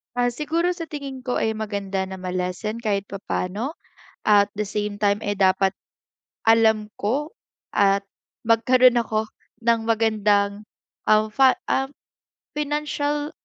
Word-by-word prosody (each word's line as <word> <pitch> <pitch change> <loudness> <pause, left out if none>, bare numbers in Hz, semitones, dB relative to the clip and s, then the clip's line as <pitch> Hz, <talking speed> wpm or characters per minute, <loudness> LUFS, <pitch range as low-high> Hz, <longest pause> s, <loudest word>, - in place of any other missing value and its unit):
Ah, 245 0 +2
siguro 325 +6 0
sa 335 -2 -6
tingin 280 -3 -6
ko, 250 - -1
eh, 220 - +1
maganda 200 -3 -3
na 190 - -6
ma-lessen 185 +4 -3
kahit 205 -4 0
papa'no. 200 - -3 0.5
At 205 -1 +5
the 210 -1 -1
same 205 0 -3
time, 205 0 +2
eh, 205 -1 -2
dapat 190 0 +3 0.8
alam 220 -1 +4
ko 275 - -1 0.4
at 200 0 +3 0.4
magkaroon 245 +2 +5
ako 220 -1 -1 0.4
ng 230 0 +3
magandang, 210 -2 +2 0.4
um, 215 0 +4
fa 265 +3 +5
um, 270 +1 0 0.7
financial 295 0 -1
220 Hz, 125 wpm, -23 LUFS, 200-255 Hz, 0.8 s, At